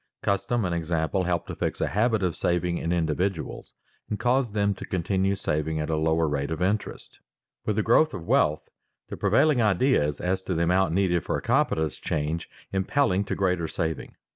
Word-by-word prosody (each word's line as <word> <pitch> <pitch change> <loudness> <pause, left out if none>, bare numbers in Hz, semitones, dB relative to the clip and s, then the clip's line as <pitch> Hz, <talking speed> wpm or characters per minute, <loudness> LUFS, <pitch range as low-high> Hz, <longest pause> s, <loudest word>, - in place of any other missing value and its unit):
Custom 100 +3 0
and 90 - -1
example 85 +2 -1
help 85 -2 0
to - - -6
fix - - -2
a - - +1
habit 110 0 +1
of 90 -3 0
saving 90 0 0
in 85 - -2
individuals 85 +1 -2 0.3
and 105 - -2
cause 125 0 +1
them 100 -1 +1
to - - -9
continue 95 +1 0
saving 80 -3 -1
at 75 +1 -2
a - - +1
lower 80 +1 +2
rate 70 -1 -1
of 80 -1 -3
interest. 100 +3 -2 0.5
With 105 - +1
the 110 - +1
growth 155 +6 +4
of 85 - -7
wealth, 75 -2 +2 0.4
the - - -5
prevailing 150 -6 +3
ideas 100 - +2
as 95 +1 -1
to 95 - -1
the 85 - +1
amount 90 0 +2
needed 90 -3 +2
for - - -1
a - - -5
competence 80 -3 +1
change, 80 +2 -2 0.2
impelling 100 0 +1
to 110 - -2
greater 90 -4 0
saving. 80 -1 -4
90 Hz, 190 wpm, -26 LUFS, 80-100 Hz, 0.5 s, growth